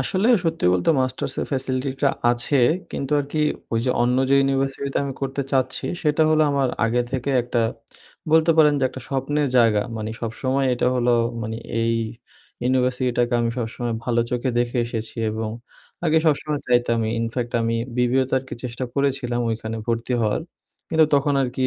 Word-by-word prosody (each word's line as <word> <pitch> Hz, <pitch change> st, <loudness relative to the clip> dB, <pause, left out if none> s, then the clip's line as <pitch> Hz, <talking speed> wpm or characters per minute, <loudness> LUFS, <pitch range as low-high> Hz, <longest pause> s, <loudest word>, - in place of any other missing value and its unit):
আসলে 185 Hz, -, +1 dB, 0.2 s
সত্যি 165 Hz, 0 st, -1 dB
বলতে 90 Hz, -, +2 dB
মাস্টার্সের 130 Hz, 0 st, -2 dB
ফ্যাসিলিটিটা 135 Hz, +1 st, 0 dB, 0.2 s
আছে। 120 Hz, +3 st, +1 dB, 0.3 s
কিন্তু 135 Hz, +1 st, -3 dB
আর 140 Hz, -, -3 dB
কি 155 Hz, -, +1 dB, 0.3 s
ওই 115 Hz, -, +2 dB
যে 130 Hz, -, +2 dB
অন্য 125 Hz, +1 st, +2 dB
যে -, -, +6 dB
ইউনিভার্সিটিতে 135 Hz, 0 st, -1 dB
আমি 140 Hz, -, -3 dB
করতে 135 Hz, 0 st, -2 dB
চাচ্ছি 130 Hz, -1 st, 0 dB, 0.2 s
সেটা 150 Hz, +1 st, +2 dB
হল 155 Hz, -, +3 dB
আমার 140 Hz, -2 st, +1 dB, 0.2 s
আগে 120 Hz, +2 st, +1 dB
থেকে 130 Hz, +1 st, -1 dB
একটা 120 Hz, -1 st, 0 dB, 0.7 s
বলতে 160 Hz, +1 st, +5 dB
পারেন 150 Hz, -2 st, +6 dB
যে -, -, +2 dB
একটা 130 Hz, -, -9 dB
স্বপ্নের 140 Hz, +2 st, 0 dB
জায়গা 110 Hz, -3 st, +4 dB
মানে 110 Hz, 0 st, -4 dB
সবসময় 130 Hz, +4 st, -1 dB
এটা 125 Hz, -, 0 dB
হল 125 Hz, -1 st, +1 dB, 0.3 s
মানে 110 Hz, 0 st, -4 dB, 0.3 s
এই 115 Hz, 0 st, +1 dB, 0.7 s
ইউনিভার্সিটিটাকে 125 Hz, -1 st, +1 dB
আমি 115 Hz, 0 st, 0 dB
সবসময় 120 Hz, 0 st, -3 dB
ভালো 120 Hz, -1 st, +1 dB
চোখে 125 Hz, +1 st, -1 dB
দেখে 120 Hz, +1 st, 0 dB
এসেছি 115 Hz, -2 st, -5 dB
এবং 110 Hz, 0 st, -3 dB, 0.6 s
আগে 160 Hz, +1 st, +4 dB
সবসময় 150 Hz, 0 st, +1 dB
চাইতামই 120 Hz, -2 st, +2 dB
ইনফ্যাক্ট 120 Hz, +1 st, -3 dB
আমি 115 Hz, 0 st, 0 dB, 0.2 s
বিবিএ 125 Hz, +2 st, +2 dB
তে -, -, 0 dB
আর 130 Hz, -, -10 dB
কি -, -, -5 dB
চেষ্টা 125 Hz, +1 st, -4 dB
করেছিলাম 135 Hz, -3 st, 0 dB
ওইখানে 110 Hz, 0 st, -4 dB
ভর্তি 115 Hz, +2 st, -1 dB
হওয়ার 110 Hz, +6 st, 0 dB, 0.5 s
কিন্তু 160 Hz, -1 st, +4 dB
তখন 140 Hz, 0 st, +2 dB
আর 130 Hz, -, 0 dB
কি 130 Hz, -, +2 dB
130 Hz, 170 wpm, -22 LUFS, 120-140 Hz, 0.7 s, যে